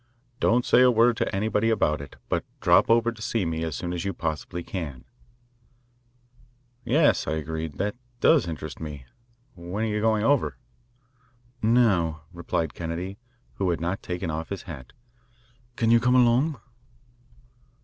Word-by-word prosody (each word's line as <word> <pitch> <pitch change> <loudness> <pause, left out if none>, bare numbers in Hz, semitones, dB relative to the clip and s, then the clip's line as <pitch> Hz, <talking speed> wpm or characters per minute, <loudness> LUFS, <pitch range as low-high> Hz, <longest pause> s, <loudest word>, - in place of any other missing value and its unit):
Don't 120 +2 +2
say - - +5
a 125 - +7
word 120 0 +4
to - - -1
anybody 110 +2 +1
about 75 -10 +1
it, 70 - -10
but - - -1 0.2
drop - - +4
over 115 0 +4
to 115 -2 -13
see 110 -3 -1
me 80 0 -2
as 80 -2 -3
soon 90 0 -4
as 85 - -3
you 100 0 -2
possibly 80 +2 -4
can." 75 -10 -6 1.8
"Yes," 145 +6 +3
I - - 0
agreed, 80 0 -4
"that 100 +2 -1 0.2
does 150 - +4
interest 75 -4 -6
me. 75 -4 -7 0.5
When 90 +4 -5
are - - +1
you 105 -1 -1
going 110 -1 +2
over?" 140 +4 +2 1.0
"Now," 100 -9 +2
replied 85 -2 -2
Kennedy, 85 +4 -5 0.4
who 95 -2 0
had 85 - 0
not 90 +4 -2
taken 90 -2 -4
off 80 +1 -4
his 100 - -5
hat. 70 -9 -9 0.8
"Can 115 -1 +2
you 115 - +6
come 125 +2 +2
along?" 125 +5 +3
95 Hz, 155 wpm, -26 LUFS, 80-115 Hz, 1.8 s, a